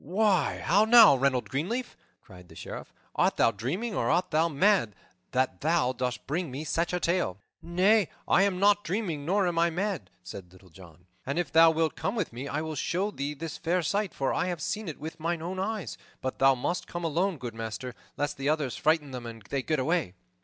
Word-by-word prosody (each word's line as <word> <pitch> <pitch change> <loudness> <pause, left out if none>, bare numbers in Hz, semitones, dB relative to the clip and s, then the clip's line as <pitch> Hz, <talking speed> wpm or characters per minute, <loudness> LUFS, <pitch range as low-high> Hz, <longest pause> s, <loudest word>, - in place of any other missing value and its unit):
"Why, 190 +2 +1
how 200 +6 +4
now, 225 - +8
Reynold 130 -4 +1
Greenleaf," 185 - -3 0.3
cried 90 -3 -15
the - - -14
Sheriff, - - -8 0.2
"art - - +1
thou - - +4
dreaming 165 - -3
or 120 - 0
art 180 +3 +1
thou 160 +2 +2
mad, 150 - +2 0.3
that 130 +1 -1
thou 155 -5 +2
dost 125 0 -3
bring 165 +3 -2
me 135 +4 -5
such, 165 +2 -1
a 180 - -1
tale?" 170 - 0 0.2
"Nay, 190 +4 +3 0.2
I - - +4
am 195 -2 +1
not 205 +1 +4
dreaming 170 -6 -3
nor 195 +1 +2
am 170 -1 0
I 170 0 +4
mad," 190 +3 -3
said 90 -3 -9
Little 95 -1 -19
John, 90 -1 -16 0.2
"and 140 +3 -3
if 175 - -1
thou 165 0 +7
wilt 160 0 0
come 200 - -2
with 205 - -2
me, 130 +4 -6
I 145 +2 -2
will 160 0 -4
show 185 +7 -1
thee 145 -3 -4
this 160 +2 -6
fair 175 +2 0
sight, 200 +3 0
for 135 - -1
I - - 0
have 175 -2 -3
seen 210 +7 -3
it 155 - -6
with 160 +1 -7
mine 165 0 -2
own 185 +2 -4
eyes. 210 0 -3 0.2
But 130 - -4
thou 135 0 +5
must 175 +8 -3
come 175 0 -5
alone, 170 +3 0
good 120 -4 -6
master, 115 +3 -6 0.2
lest 145 0 -2
the 135 +1 -1
others 150 -5 0
frighten 155 -3 +1
them 125 -2 -6
and 115 -2 -9
they 140 - 0
get 155 +4 -1
away." 145 - 0
160 Hz, 215 wpm, -28 LUFS, 130-180 Hz, 0.3 s, now